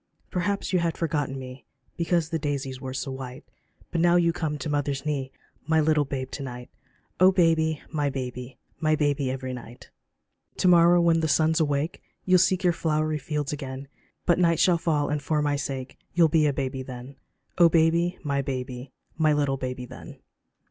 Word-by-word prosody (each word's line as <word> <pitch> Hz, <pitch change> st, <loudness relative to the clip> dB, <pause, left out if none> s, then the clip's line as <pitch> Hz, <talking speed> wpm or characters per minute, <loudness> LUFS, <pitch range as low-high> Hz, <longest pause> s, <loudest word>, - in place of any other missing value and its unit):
Perhaps 195 Hz, +2 st, -1 dB
you 180 Hz, -, +4 dB
had 170 Hz, -1 st, -1 dB
forgotten 145 Hz, -5 st, -1 dB
me 130 Hz, 0 st, -9 dB, 0.3 s
Because 170 Hz, -1 st, 0 dB
the 165 Hz, -, -1 dB
daisies 140 Hz, -3 st, -3 dB
were 130 Hz, -, -5 dB
so 135 Hz, +1 st, -4 dB
white, 130 Hz, +1 st, -7 dB, 0.5 s
But 170 Hz, -, 0 dB
now 175 Hz, 0 st, +4 dB
you 170 Hz, -1 st, +3 dB
come 155 Hz, -3 st, -2 dB
to 140 Hz, -, -5 dB
mother's 145 Hz, -1 st, -1 dB
knee, 140 Hz, -3 st, -2 dB, 0.4 s
My 160 Hz, 0 st, +3 dB
little 155 Hz, -1 st, +3 dB
babe 130 Hz, -1 st, -4 dB
to -, -, -6 dB
night 125 Hz, -2 st, -7 dB
j -, -, -39 dB, 0.4 s
Oh 185 Hz, +1 st, +7 dB
baby, 160 Hz, -4 st, +2 dB
my 145 Hz, -3 st, 0 dB
baby 125 Hz, -1 st, -6 dB
I -, -, -43 dB
My 155 Hz, -1 st, +2 dB
baby 145 Hz, -3 st, 0 dB
every 130 Hz, 0 st, -4 dB
night. 120 Hz, -1 st, -11 dB, 0.7 s
To -, -, +2 dB
morrow 175 Hz, 0 st, +6 dB
when 170 Hz, -1 st, +4 dB
the 160 Hz, -, 0 dB
sun's 160 Hz, +2 st, +3 dB
awake 145 Hz, +1 st, -1 dB, 0.2 s
You'll 185 Hz, -1 st, +5 dB
seek 185 Hz, +1 st, +2 dB
your 175 Hz, -1 st, +4 dB
flowery 155 Hz, -2 st, 0 dB
fields 150 Hz, 0 st, -3 dB
again. 135 Hz, -1 st, -6 dB, 0.4 s
But 175 Hz, -, +3 dB
night 170 Hz, -2 st, +3 dB
shall 175 Hz, -2 st, +4 dB
fall, 150 Hz, -3 st, +1 dB
and 150 Hz, 0 st, -1 dB
for 150 Hz, +2 st, 0 dB
my 145 Hz, -1 st, +1 dB
sake 135 Hz, -2 st, -5 dB, 0.2 s
You'll 170 Hz, -2 st, +5 dB
be 155 Hz, -1 st, +3 dB
a -, -, +2 dB
baby 135 Hz, -1 st, -3 dB
then; 130 Hz, +1 st, -9 dB, 0.4 s
Oh 170 Hz, -1 st, +8 dB
baby, 170 Hz, +2 st, +2 dB
my 140 Hz, -2 st, 0 dB
baby 130 Hz, -1 st, -5 dB, 0.3 s
I -, -, -2 dB
My 155 Hz, -1 st, +4 dB
little 145 Hz, -2 st, +1 dB
baby 125 Hz, -1 st, -4 dB
then. 125 Hz, +1 st, -11 dB
150 Hz, 195 wpm, -26 LUFS, 135-165 Hz, 0.7 s, Oh